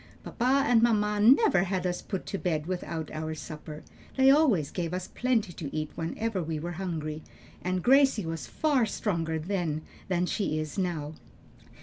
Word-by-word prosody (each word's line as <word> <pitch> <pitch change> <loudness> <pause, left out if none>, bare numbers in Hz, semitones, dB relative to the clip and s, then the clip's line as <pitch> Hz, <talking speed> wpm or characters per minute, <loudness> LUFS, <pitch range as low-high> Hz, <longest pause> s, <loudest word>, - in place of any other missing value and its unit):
Papa 260 +3 +1
and 240 -4 +4
mamma 210 -3 +2
never 210 -4 +5
had 185 -1 -2
us 180 -1 -1
put 190 -3 -5
to 195 - -4
bed 155 -4 -1
without 170 -3 -4
our 155 0 -4
supper; 150 0 -8 0.3
they 265 0 +7
always 255 - +3
gave 175 -1 -3
us 185 0 -4
plenty 235 -7 0
to 155 -4 -6
eat 155 -1 -2
whenever 195 +5 -2
we 160 -1 -3
were 170 +3 -4
hungry, 155 -4 -3 0.4
and 180 0 -1
Gracie 265 -6 +4
was 160 -6 -4
far 265 - +1
stronger 165 -7 -1
then 160 -2 -2 0.2
than 180 -1 +1
she 185 -4 -1
is 155 -1 -4
now." 165 -6 -2
180 Hz, 165 wpm, -28 LUFS, 160-215 Hz, 0.4 s, they